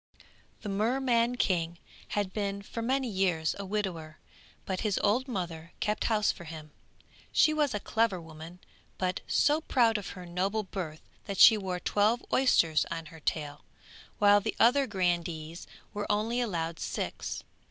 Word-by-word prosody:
The 210 - -4
Merman 235 +3 +1
King 170 -7 0 0.4
had 200 -2 -1
been 200 -1 -2
for 230 - -6
many 260 +3 0
years 185 -7 +1
a 200 - -4
widower, 185 -6 -3 0.5
but 190 -1 -2
his 210 -3 0
old 240 +6 +2
mother 170 -7 -5
kept 210 0 -1
house 215 -2 +2
for 170 - -11
him; 155 -1 -9 0.6
she 310 - +4
was 295 -6 +1
a - - -1
clever 220 -2 0
woman, 160 +1 -11 0.4
but 185 -1 -1
so 300 +2 +3
proud 230 -7 +2
of 205 - -7
her 180 - -8
noble 190 +5 -1
birth 175 -5 -6 0.2
that 200 - -4
she 225 - +9
wore 190 -3 -3
twelve 215 +6 +1
oysters 165 -12 +4
on 165 -1 -4
her 160 - -11
tail, 145 -2 -3 0.5
while 205 0 +6
the 220 - -3
other 265 +4 +5
grandees 175 -4 -2 0.3
were 205 0 -2
only 225 +4 0
allowed 170 -7 -2
six. - - -4
200 Hz, 155 wpm, -29 LUFS, 170-225 Hz, 0.6 s, she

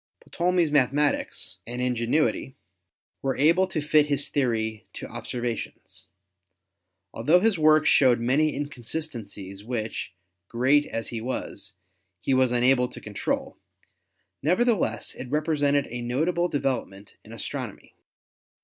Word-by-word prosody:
Ptolemy's 175 -2 +1
mathematics 145 +1 +1
and 120 +1 -5
ingenuity 125 +3 0 0.7
were 135 -1 -1
able 170 +6 +4
to 180 -4 -2
fit 150 0 +4
his 145 -1 +1
theory 110 -5 -1
to - - -6
observations. 120 -2 -5 1.1
Altho 150 +11 +4
his 210 -3 +2
work 155 0 +5
showed 125 -4 +5
many 140 +6 +2
inconsistencies 120 -8 -5
which, 110 -3 -4 0.4
great 130 +6 +3
as 115 -1 -4
he 115 -2 -4
was, 110 -4 -5 0.5
he 135 - 0
was 130 -1 +3
unable 125 +1 +3
to - - -9
control, - - -3 0.8
nevertheless 180 - +1
it 125 - -8
represented 145 -1 +1
a 120 0 -4
notable 160 +9 0
de 145 - -1
velopment 105 -7 -3
in - - -14
astronomy. - - -6
135 Hz, 120 wpm, -26 LUFS, 120-155 Hz, 1.1 s, work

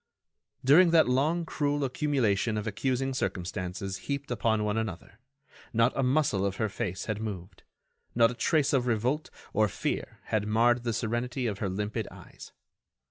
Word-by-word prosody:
During 165 +7 +7
that 165 -4 +5
long, 150 +7 +1
cruel 145 -2 -1
accumulation 125 -6 +1
of 105 - -3
accusing 130 +5 -1
circumstances 95 -2 -3
heaped 140 -1 -3
one 115 -2 +1
upon 105 0 0
another, 105 -1 -5 0.5
not 115 +2 +3
a - - +1
muscle 130 -7 +2
of 100 -1 -1
her 110 0 -1
face 100 -3 -4
had 110 0 -3
moved, 95 -3 -6 0.5
not 115 0 +5
a - - -5
trace 145 +3 +1
of 125 -2 +2
revolt 125 +7 0 0.2
or 110 0 +3
fear - - -3
had 105 -1 -1
marred 120 +3 +3
the 115 - 0
serenity 120 +3 -2
of 105 -3 -2
her 100 - -1
limpid 105 +3 -3
eyes. - - -13
115 Hz, 160 wpm, -29 LUFS, 105-135 Hz, 0.5 s, During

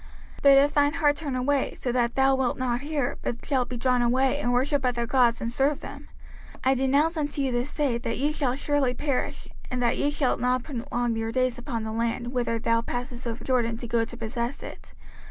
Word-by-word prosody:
05:030:017 - - -14
But 275 -1 +7
if 285 +1 +4
thine 290 0 +3
heart 295 -3 +3
turn 290 -3 -4
away, 265 +2 0
so 250 - -2
that 240 -1 0
thou 270 0 +4
wilt 265 -2 0
not 245 -1 -1
hear, 290 -3 -2
but 240 - -4
shalt 260 -4 0
be 250 - -4
drawn 250 0 +2
away, 260 +3 +2
and 245 -4 0
worship 270 +3 +1
other 240 -2 0
gods, 240 -1 +3
and 230 - -2
serve 275 +4 +1
them; 285 +1 -9 0.5
05:030:018 - - -17
I 265 - +4
denounce 280 +6 +2
unto 290 -1 -1
you 265 - 0
this 245 +4 -1
day, 270 -6 0
that 235 -2 -3
ye 290 +3 +1
shall 275 -5 -1
surely 280 -2 0
perish, 280 -1 -2 0.2
and 250 - -2
that 235 - +1
ye 285 - +2
shall 290 -3 0
not 250 0 +1
prolong 240 -3 -2
your 225 0 -2
days 255 0 0
upon 240 -3 -4
the 220 - -4
land, 235 +2 -2
whither 240 -2 0
thou 230 0 +1
passest 245 +1 -5
over 235 +1 -5
Jordan 235 -3 +1
to 240 - -7
go 230 0 +1
to 235 +1 -7
possess 235 +3 -4
it. - - -11
255 Hz, 225 wpm, -26 LUFS, 240-280 Hz, 0.5 s, But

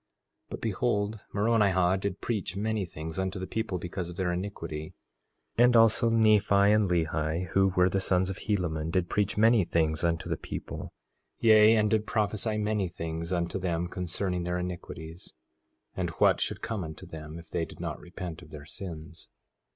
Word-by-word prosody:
4:14 - - -46
But - - -7
behold, 105 -1 -1
Moronihah 100 -4 +3
did 100 -1 -3
preach 105 -5 -2
many 105 0 -1
things 80 +1 -6
unto 95 +1 -2
the 95 - -4
people 110 -2 -2
because 90 0 -5
of 90 - -8
their 90 -1 0
iniquity, 85 -5 -5 0.6
and 120 0 +6
also 115 +1 +5
Nephi 110 -3 +4
and 100 0 +4
Lehi, 80 0 0
who 95 +2 +3
were 90 0 +5
the 95 +1 0
sons 95 0 +2
of 95 - -7
Helaman, 80 -6 -1
did 90 0 0
preach 105 -1 0
many 110 -1 +5
things 80 -2 0
unto 80 -1 0
the - - -1
people, - - -6 0.5
yea, 110 -1 +7
and 105 -1 +2
did 110 -1 +1
prophesy 110 0 0
many 105 -2 0
things 85 0 -5
unto 85 +1 -1
them 90 -2 -1
concerning 90 +1 -3
their 90 0 -1
iniquities, 85 -2 -7 0.6
and - - -1
what - - +4
should - - -2
come 110 -5 -2
unto 80 -2 -8
them 80 0 -8
if 85 -1 -12
they 85 - 0
did 80 - -9
not - - -4
repent 90 -2 -7
of - - -14
their 75 -1 -10
sins. 80 -4 -9
95 Hz, 175 wpm, -29 LUFS, 85-105 Hz, 0.6 s, yea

